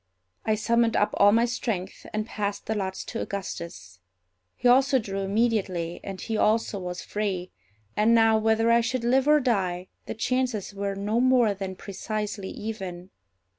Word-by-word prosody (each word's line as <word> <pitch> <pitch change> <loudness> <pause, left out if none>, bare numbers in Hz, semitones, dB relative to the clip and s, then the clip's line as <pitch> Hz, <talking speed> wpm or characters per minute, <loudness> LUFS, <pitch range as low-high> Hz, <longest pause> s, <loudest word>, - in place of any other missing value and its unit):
I 215 - +2
summoned 230 +1 +2
up 205 - +2
all 200 0 +6
my 230 +2 +4
strength, 225 -6 -4
and 215 0 -2
passed 205 -2 -3
the 220 - -1
lots 190 -3 -3
to 230 - -4
Augustus. 170 - -6 0.6
He 250 - 0
also 265 +2 +5
drew 195 -5 -3
immediately, 195 -5 0
and 195 -1 -6
he 225 - -3
also 215 -1 +1
was 180 -1 -5
free; 195 -4 -3 0.4
and 220 +2 +4
now, 225 -1 +5
whether 225 +1 +3
I 235 0 +5
should 240 +1 -2
live 260 +3 +3
or 300 0 +6
die, 185 -8 -1 0.2
the - - -4
chances 245 -3 -1
were 200 0 -3
no 205 +4 0
more 250 -4 +4
than 190 -1 -5
precisely 205 0 -4
even. 190 -4 -6
215 Hz, 165 wpm, -26 LUFS, 195-230 Hz, 0.6 s, all